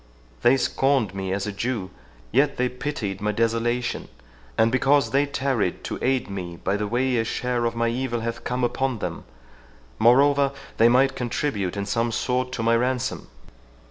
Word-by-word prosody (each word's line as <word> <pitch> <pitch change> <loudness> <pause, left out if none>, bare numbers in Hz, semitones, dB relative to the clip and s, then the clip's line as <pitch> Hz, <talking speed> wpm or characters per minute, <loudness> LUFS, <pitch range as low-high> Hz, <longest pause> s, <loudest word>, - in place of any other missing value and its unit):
They 125 +3 +5
scorned 135 -5 +1
me 95 -1 -3
as 100 +1 -1
a 105 - -3
Jew, 100 -2 -3 0.4
yet 140 +4 +2
they 125 0 +1
pitied 125 -7 -4
my 105 0 +1
desolation, 115 +2 0 0.5
and 115 +1 +4
because 135 -1 +3
they 140 +2 +2
tarried 130 -9 -1
to - - -4
aid 130 0 +1
me 90 -4 -6
by 95 - -1
the 105 0 -2
way, 125 +3 +1
a - - +2
share 120 +1 -1
of 115 0 -1
my 115 0 +1
evil 120 -1 -2
hath 115 +1 -4
come 125 0 -2
upon 130 +1 0
them; - - -5 0.7
moreover, 140 +4 +5 0.2
they 115 +1 +6
may 130 +3 +5
contribute 120 -6 -2
in 100 - -2
some 115 +3 0
sort 125 +2 -1
to 115 - -2
my 115 +1 +3
ransom." 125 +1 -1
120 Hz, 175 wpm, -24 LUFS, 110-130 Hz, 0.7 s, they